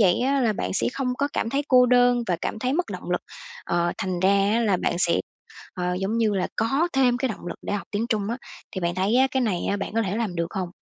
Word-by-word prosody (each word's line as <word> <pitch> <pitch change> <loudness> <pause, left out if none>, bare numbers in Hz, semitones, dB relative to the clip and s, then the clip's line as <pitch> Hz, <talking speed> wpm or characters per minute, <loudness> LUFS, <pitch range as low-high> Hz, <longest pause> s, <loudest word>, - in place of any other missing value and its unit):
vậy 185 -4 +4
á 275 +2 +2
là 230 -4 +2
bạn - - -3
sẽ - - +1
không 255 -2 -1
có 285 - +1
cảm 225 - -1
thấy 280 +3 0
cô 250 -2 +6
đơn 245 0 +4
và 180 -3 +1
cảm - - -3
thấy 255 +3 -1
mất 350 +4 0
động - - -7
lực, - - +1 0.4
ờ, 175 0 0
thành 185 -2 -2
ra 190 - +4 0.3
á 230 - +2
là 210 -5 +2
bạn 175 - -1
sẽ, 170 -1 +2 0.5
ờ, 180 -1 -1
giống 205 +4 -1
như 225 -2 +3
là 185 -2 0
có 270 +10 +1
thêm 255 -3 +3
cái 265 +1 -1
động 215 - -7
lực - - -5
để - - -4
học 205 - -3
tiếng 215 +3 -1
Trung 215 -4 -1
á. 235 - -2 0.4
Thì 190 - -4
bạn 170 0 -1
thấy 195 +5 +1
á 260 +1 +5
cái 265 - 0
này 210 -8 0 0.2
bạn - - -4
có 225 - +2
thể 200 -1 -2
làm 220 -6 -2
được 170 - 0
hông? 185 -3 -2
220 Hz, 275 wpm, -24 LUFS, 185-250 Hz, 0.5 s, cô